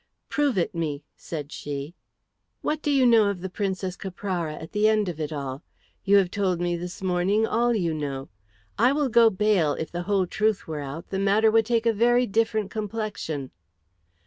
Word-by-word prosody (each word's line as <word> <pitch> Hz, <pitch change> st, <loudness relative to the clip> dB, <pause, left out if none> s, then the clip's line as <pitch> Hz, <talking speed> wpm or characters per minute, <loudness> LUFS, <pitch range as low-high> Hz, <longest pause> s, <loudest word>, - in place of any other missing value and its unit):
"Prove 290 Hz, -7 st, +1 dB
it 175 Hz, -, 0 dB
me," 155 Hz, -4 st, -3 dB
said 150 Hz, -3 st, -7 dB
she. 145 Hz, +2 st, -5 dB, 0.7 s
"What 310 Hz, 0 st, -1 dB
do 295 Hz, -, -1 dB
you 275 Hz, -3 st, +4 dB
know 230 Hz, -3 st, +6 dB
of 195 Hz, -3 st, -4 dB
the 190 Hz, 0 st, -5 dB
Princess 190 Hz, -2 st, -2 dB
Caprara 180 Hz, -4 st, -4 dB
at 160 Hz, -, -9 dB
the 210 Hz, +1 st, +3 dB
end 215 Hz, -2 st, +2 dB
of 170 Hz, -3 st, -5 dB
it 155 Hz, 0 st, -3 dB
all? 140 Hz, -2 st, -5 dB, 0.4 s
You 200 Hz, +1 st, +5 dB
have 185 Hz, -3 st, +2 dB
told 190 Hz, -4 st, 0 dB
me 175 Hz, 0 st, 0 dB
this 180 Hz, +2 st, -7 dB
morning 185 Hz, +4 st, +2 dB
all 235 Hz, +2 st, +1 dB
you 170 Hz, -6 st, 0 dB
know. 140 Hz, -3 st, -4 dB, 0.5 s
I 245 Hz, +4 st, +5 dB
will 290 Hz, -2 st, +1 dB
go 230 Hz, 0 st, +6 dB
bail 195 Hz, -7 st, +2 dB
if 160 Hz, -, -5 dB
the 175 Hz, -, -3 dB
whole 195 Hz, -2 st, +3 dB
truth 215 Hz, +3 st, 0 dB
were 155 Hz, -2 st, -4 dB
out 145 Hz, +5 st, -7 dB
the 190 Hz, -, -1 dB
matter 205 Hz, +3 st, +3 dB
would 225 Hz, -1 st, +3 dB
take 235 Hz, -1 st, +1 dB
a 230 Hz, -, +4 dB
very 240 Hz, +3 st, +3 dB
different 220 Hz, -1 st, 0 dB
complexion." 210 Hz, -, -4 dB
195 Hz, 195 wpm, -25 LUFS, 165-220 Hz, 0.7 s, know